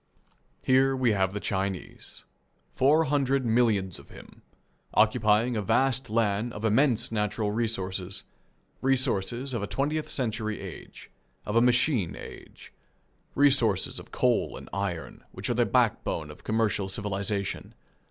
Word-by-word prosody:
Here 135 +1 +4
we 130 -3 +2
have 95 -2 +1
the 105 - -4
Chinese, 95 -2 -4 0.5
four 150 +5 +4
hundred 135 -3 +1
millions 110 -6 +1
of - - -16
him, - - -14 0.5
occupying 110 +1 +3
a 105 - 0
vast 125 +4 +1
land 110 +1 0
of 105 - -5
immense 115 +2 +2
natural 105 -1 -1
resources 95 -4 -2 0.6
resources 130 -1 0
of 115 - -2
a 100 - -3
twentieth 150 +3 -1
century 110 -4 -2
age, 95 -4 -10 0.3
of 105 - -3
a 115 - +6
machine 125 - +2
age; - - -12 0.6
resources 130 -9 +3
of - - -12
coal - - +1
and - - -11
iron, 100 -4 -4
which - - -3
are - - +2
the - - +2
backbone 75 -2 0
of 75 - -15
commercial 110 -3 0
civilization. 100 0 -3
110 Hz, 135 wpm, -27 LUFS, 100-130 Hz, 0.6 s, a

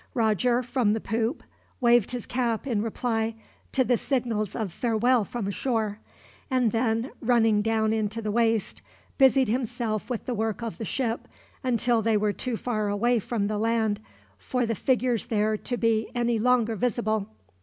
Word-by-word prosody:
Roger, 235 +2 +2
from 240 -4 +1
the 220 - -1
poop, 225 +6 -2 0.4
waved 240 -4 +4
his 245 -2 -4
cap 240 -2 -1
in 230 -6 0
reply 225 0 -1 0.4
to 265 - +3
the 245 -1 +2
signals 230 -6 -1
of 210 -7 -3
farewell 240 +2 +2
from 205 -1 -3
shore; 220 -3 -1 0.5
and 255 -4 +2
then, 230 +2 0
running 225 -4 +3
down 220 0 +1
into 220 0 -1
the 215 -2 -2
waist, 225 -1 +1 0.4
busied 265 -1 +5
himself 235 -2 -2
with 245 -3 -3
the 250 - -2
work 220 0 -2
of 230 0 -5
the 225 - -3
ship, 235 0 -2 0.4
until 240 -2 +2
they 220 0 +2
were 210 0 +1
too 245 0 -3
far 215 -4 -1
away 235 +4 +2
from 215 0 -2
the 210 0 -1
land 220 -2 +1 0.4
for 250 -2 -1
the 230 - -1
figures 245 -1 0
there 215 -2 +1
to 245 +3 -3
be 225 -1 +1
any 240 -1 +1
longer 235 -1 +2
visible. 220 -2 0
230 Hz, 165 wpm, -26 LUFS, 215-245 Hz, 0.5 s, busied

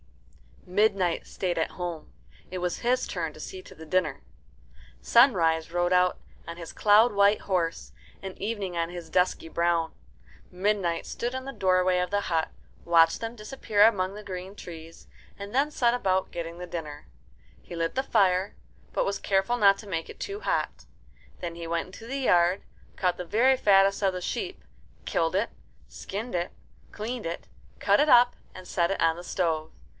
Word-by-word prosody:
Midnight 190 -2 +1
stayed 180 -3 -2
at 160 - -1
home. 175 -3 -6 0.4
It 185 - -5
was 180 -1 -2
his 250 +2 +1
turn 165 -5 -3
to - - -14
see 185 +4 -7
to - - -14
the 160 - -11
dinner. 160 -4 0 0.8
Sunrise 165 - +4
rode 175 +1 +1
out 180 0 +3 0.3
on 170 0 -7
his 170 -2 -8
cloud 215 +2 +5
white 200 +1 +4
horse, 175 -4 -2 0.3
and 190 -1 -7
Evening 200 -4 -3
on 165 0 0
his 175 -2 -8
dusky 180 -1 +1
brown. 170 -1 +1 0.6
Midnight 185 -2 0
stood 240 +1 -4
in 260 0 -5
the 275 - -5
doorway 185 -3 +2
of 180 0 -1
the 205 +1 0
hut, 165 -4 0 0.4
watched 165 +2 +4
them 230 +1 -4
disappear 215 -2 +1
among 195 -4 +3
the 210 - -8
green 190 0 -7
trees, 165 -3 -11 0.3
and 200 +1 -8
then 280 +3 +2
set 240 -5 +2
about 190 -6 0
getting 170 0 -5
the 180 - -6
dinner. 150 -4 -7 0.5
He 175 - -9
lit 165 0 -1
the 265 - 0
fire, 195 -5 +2 0.4
but - - +1
was 200 0 -2
careful 195 +5 +1
not 200 -3 +5
to 210 - -11
make 165 -4 -3
it - - -11
too 400 +1 -5
hot. - - -2 0.6
Then 170 -1 -4
he 170 -1 -6
went 170 +1 -1
into 225 +5 -12
the 270 +3 -3
yard, 180 -6 +3 0.3
caught 180 -2 0
the 180 - -5
very 245 +8 +3
fattest 195 -3 +4
of 195 -2 +2
the 180 - -4
sheep, 375 - -4 0.4
killed 165 +1 0
it, 205 +4 +1 0.4
skinned 220 +5 -6
it, 175 0 -1 0.4
cleaned 230 +2 -5
it, 170 - -6 0.3
cut 200 0 +3
it 300 +1 +3
up, 245 -1 +6 0.2
and 185 -1 -10
set 170 -2 +1
it 195 - -2
on 165 -1 +3
the 175 - -8
stove. 160 -3 -1
185 Hz, 180 wpm, -27 LUFS, 170-210 Hz, 0.8 s, up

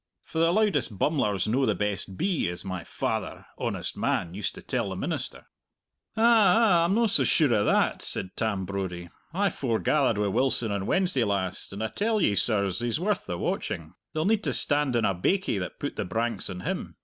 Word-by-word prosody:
For 160 - -5
the 165 +1 +4
loudest 175 - +1
bummler's 105 - +1
no 125 +5 +2
the - - +2
best 100 -2 -3
bee, 185 - 0
as 90 +3 -6
my 95 -2 -4
father, - - -3
honest - - -3
man, 85 -1 -1
used 100 -1 -3
to - - -10
tell - - -1
the - - -4
minister." - - -4 0.7
"Ah 225 - +4 0.3
ah, 185 -8 +4
I'm 185 +4 +1
no 235 +1 +3
so 210 - +2
sure 150 -7 +3
o' 105 -2 +3
that," - - +2
said 95 - -2
Tam 105 -4 -1
Brodie. 90 -3 -4 0.2
"I 195 +3 +1
forgathered 130 -1 +1
wi' 105 - +1
Wilson 115 +1 +1
on 100 -1 -2
Wednesday 180 -10 +2
last, 100 -3 -2
and 100 +3 -4
I 110 - -1
tell 215 - 0
ye, 105 - +3
sirs, 100 -3 +1
he's 120 +3 -1
worth 205 +4 -1
the 90 -2 -3
watching. 80 -2 -3 0.2
They'll 155 0 -1
need 215 +1 +2
to - - 0
stand 145 -3 +1
on 115 -2 +2
a 100 - +2
baikie 140 - 0
that 90 - -6
put - - -4
the - - 0
branks 115 +1 -2
on 90 -1 -6
him. - - -4
115 Hz, 205 wpm, -27 LUFS, -, 0.7 s, the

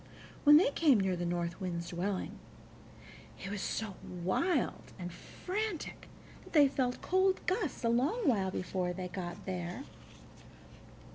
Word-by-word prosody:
When 295 +1 +10
they 320 -3 +4
came 285 -7 +4
near 190 -1 +1
the 175 0 -2
North 170 +1 -2
Wind's 170 -2 -3
dwelling, 185 +2 -2 1.0
he 195 - -7
was 205 -1 -3
so 210 -3 -3
wild 190 - -1
and 175 -2 -6
frantic 410 - -4 0.4
that - - -15
they 295 -3 +7
felt 255 -2 -1
cold 375 +1 +3
gusts 370 - -1
a 230 - +3
long 300 - +2
while 200 -7 +3
before 185 -1 -2
they 180 0 -5
got 175 -2 -6
there. 180 +5 -4
200 Hz, 140 wpm, -33 LUFS, 180-295 Hz, 1.0 s, When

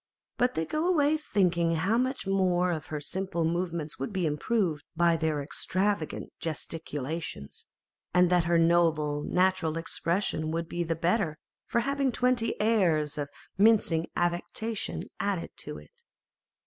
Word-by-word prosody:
but 250 +1 +1
they 160 - 0
go 310 - -1
away 310 -4 +3
thinking 175 - +1
how 185 +8 +1
much 255 +1 0
one 180 -2 +2
of 155 -3 -5
her 150 - -3
simple 170 +2 -2
movements 170 -2 -2
would 135 - -3
be 190 -3 0
improved 155 0 0
by 170 0 +4
their 160 -3 0
extravagant 185 +2 -2
gesticulations, 155 - -4 0.4
and 180 0 +4
that 175 -2 +4
her 170 0 +3
noble, 165 -3 +3
natural 180 -1 +1
expression 165 -1 -1
would 165 +1 -2
be 175 - -3
the 165 -1 0
better 170 -1 0 0.3
for 235 - +1
having 275 +1 0
twenty 245 -2 +1
airs 175 -10 +2
of 145 -2 -3 0.3
mincing 200 -6 +4
affectation 175 +5 -1 0.2
added 200 -4 -1
to - - -6
it. 480 -1 -14
175 Hz, 140 wpm, -29 LUFS, 160-205 Hz, 0.4 s, by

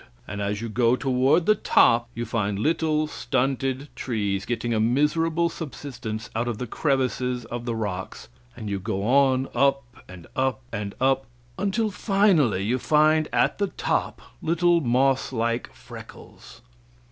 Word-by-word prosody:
And 105 0 -5
as 100 +1 -2
you - - -3
go 115 +2 +2
toward 135 +6 +2
the 215 - +6
top, 120 - +3
you 120 - -3
find 105 -4 -1
little, 155 +4 +1
stunted 135 0 -1
trees 100 -5 -2
getting 120 -1 -1
a 110 - +1
miserable 155 +8 +2
subsistence 130 -9 -6
out 115 +2 -1
of 120 -3 -2
the 125 - -4
crevices 125 -2 -1
of 120 +1 -6
the 120 -2 -2
rocks, 100 -4 -5 0.3
and 110 -3 -6
you 100 -1 -2
go 95 0 -3
on 130 +2 +3
up 140 +2 +2 0.3
and 90 -2 -11
up 130 -2 0
and 100 -1 -4
up, 135 -1 +1 0.3
until 205 +2 0
finally 190 - +2
you 120 +5 0
find 155 +2 +3
at - - +1
the 200 - +1
top - - -2 0.2
little 170 +1 +2
moss 135 +1 +2
like 115 -1 -1
freckles. - - -13
125 Hz, 150 wpm, -25 LUFS, 115-150 Hz, 0.3 s, the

